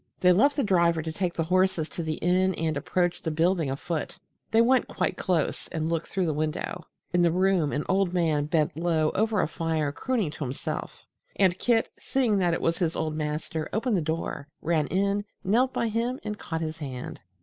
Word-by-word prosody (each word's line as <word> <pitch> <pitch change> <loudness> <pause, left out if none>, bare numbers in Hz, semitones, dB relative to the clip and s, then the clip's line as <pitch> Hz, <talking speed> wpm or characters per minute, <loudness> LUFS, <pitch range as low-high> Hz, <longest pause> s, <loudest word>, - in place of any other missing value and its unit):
They 180 - +5
left 275 +11 +4
the 280 - +1
driver 170 -5 +3
to 160 - -3
take 175 +1 -2
the 165 - 0
horses 185 -2 +2
to - - -5
the 160 -1 -2
inn 185 +2 +2
and 160 -1 -1
approached 175 +4 0
the 160 - -1
building 165 -1 +1
afoot. 160 +6 -3 0.3
They 225 - +3
went 250 +2 +4
quite - - -1
close 175 -5 -1
and 160 0 -2
looked 165 -1 -1
through 190 -2 -1
the 160 - 0
window. 155 +1 -3 0.3
In 175 - +4
the 175 - +5
room 180 -4 +2
an 145 - -1
old 190 -1 +2
man 160 -5 +1
bent 150 -1 +1
low 160 -1 +1
over 215 -1 +1
a - - +1
fire 160 -2 -1
crooning 220 - -1
to 155 - -6
himself, 130 0 -5 0.3
and 185 -2 +3
Kit, 230 -2 +2
seeing 245 -6 +1
that 175 -3 +2
it - - -4
was 165 0 0
his 170 -3 0
old 155 -1 -2
master, 155 +1 -3
opened 225 +1 0
the 180 - +1
door, 160 -2 -3 0.2
ran 160 -3 +1
in, 200 +2 +1 0.2
knelt 245 +7 +3
by 235 - 0
him 235 +4 -1
and 210 -1 -4
caught 160 -1 -4
his 160 0 -4
hand. 130 -4 -6
170 Hz, 205 wpm, -27 LUFS, 155-195 Hz, 0.3 s, They